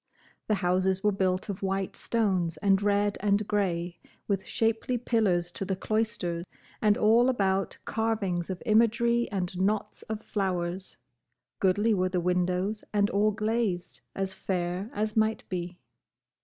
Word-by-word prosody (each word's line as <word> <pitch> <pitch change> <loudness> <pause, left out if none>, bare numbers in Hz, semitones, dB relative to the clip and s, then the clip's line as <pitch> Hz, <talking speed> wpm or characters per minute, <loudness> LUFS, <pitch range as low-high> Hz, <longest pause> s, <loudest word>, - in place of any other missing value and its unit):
The 215 - +2
houses 185 +1 +2
were 210 - +4
built 185 -1 0
of 200 -3 -5
white 195 0 -1
stones 185 -8 0
and 195 +3 +3
red 205 0 +1
and 205 +1 +1
grey; 175 -4 -1 0.3
with 195 -2 -1
shapely 225 +2 0
pillars 200 -8 +1
to 195 - -4
the 190 0 -1
cloister, 190 -5 -1 0.4
and 210 -1 +4
all 230 +4 +5
about 195 -5 0
carvings 205 -6 -1
of 185 -1 -5
imagery 235 +1 +3
and 185 -3 -3
knots 205 +2 0
of 220 0 -4
flowers; 185 -2 -2 0.6
goodly 205 +4 +3
were 185 -2 +1
the 180 0 0
windows 180 +4 0
and 205 -1 +2
all 205 +2 +3
glazed, 210 - -1
as 195 -1 -2
fair 185 +1 -2
as 215 -4 -2
might 220 0 +1
be. 175 -1 -4
195 Hz, 140 wpm, -28 LUFS, 180-215 Hz, 0.6 s, all